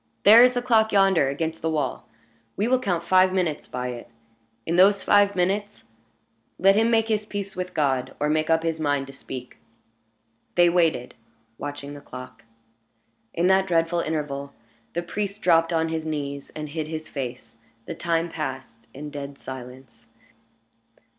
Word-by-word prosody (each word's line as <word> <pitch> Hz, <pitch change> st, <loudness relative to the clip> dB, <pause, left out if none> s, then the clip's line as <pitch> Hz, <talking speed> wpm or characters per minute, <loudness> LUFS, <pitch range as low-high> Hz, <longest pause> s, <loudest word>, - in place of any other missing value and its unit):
"There 220 Hz, +4 st, +9 dB
is 250 Hz, 0 st, +4 dB
the 245 Hz, -, -1 dB
clock 220 Hz, -3 st, +3 dB
yonder, 195 Hz, -7 st, +4 dB
against 160 Hz, +3 st, -3 dB
the 160 Hz, -, -1 dB
wall. 155 Hz, -3 st, -2 dB, 0.5 s
We 210 Hz, -, +1 dB
will 255 Hz, +1 st, +3 dB
count 175 Hz, -8 st, -1 dB
five 185 Hz, +1 st, +4 dB
minutes 175 Hz, -5 st, -1 dB
by 125 Hz, 0 st, -4 dB
it. 120 Hz, -1 st, -8 dB, 0.6 s
In 165 Hz, -, -1 dB
those 195 Hz, +2 st, +5 dB
five 205 Hz, -1 st, +4 dB
minutes, 200 Hz, +3 st, -1 dB, 0.7 s
let 195 Hz, +1 st, +5 dB
him 225 Hz, +2 st, +3 dB
make 225 Hz, -1 st, +2 dB
his 215 Hz, -2 st, 0 dB
peace 200 Hz, -2 st, -6 dB
with 180 Hz, 0 st, -5 dB
God, 130 Hz, -3 st, 0 dB
or 150 Hz, -, +1 dB
make 155 Hz, +1 st, 0 dB
up 160 Hz, 0 st, +3 dB
his 165 Hz, -1 st, -1 dB
mind 145 Hz, -3 st, 0 dB
to 135 Hz, -, -12 dB
speak." 130 Hz, -1 st, -9 dB, 1.0 s
They 175 Hz, 0 st, +5 dB
waited, 165 Hz, -8 st, +1 dB, 0.5 s
watching 145 Hz, 0 st, -6 dB
the 145 Hz, -, -10 dB
clock. 125 Hz, -3 st, -10 dB, 0.9 s
In 170 Hz, -, +1 dB
that 190 Hz, +1 st, +4 dB
dreadful 170 Hz, 0 st, +1 dB
interval, 145 Hz, -3 st, -3 dB, 0.4 s
the 175 Hz, -, -2 dB
priest 200 Hz, +3 st, -4 dB
dropped 165 Hz, -1 st, +4 dB
on 165 Hz, -1 st, +1 dB
his 160 Hz, -1 st, -3 dB
knees 140 Hz, -2 st, -4 dB
and 150 Hz, -1 st, -5 dB
hid 155 Hz, +1 st, -4 dB
his 155 Hz, 0 st, -6 dB
face. 125 Hz, -4 st, -7 dB, 0.3 s
The -, -, -5 dB
time 165 Hz, 0 st, -1 dB
passed 130 Hz, -8 st, -6 dB
in 150 Hz, +2 st, -7 dB
dead 140 Hz, -1 st, -7 dB
silence. 125 Hz, -3 st, -10 dB
160 Hz, 165 wpm, -24 LUFS, 140-190 Hz, 1.0 s, There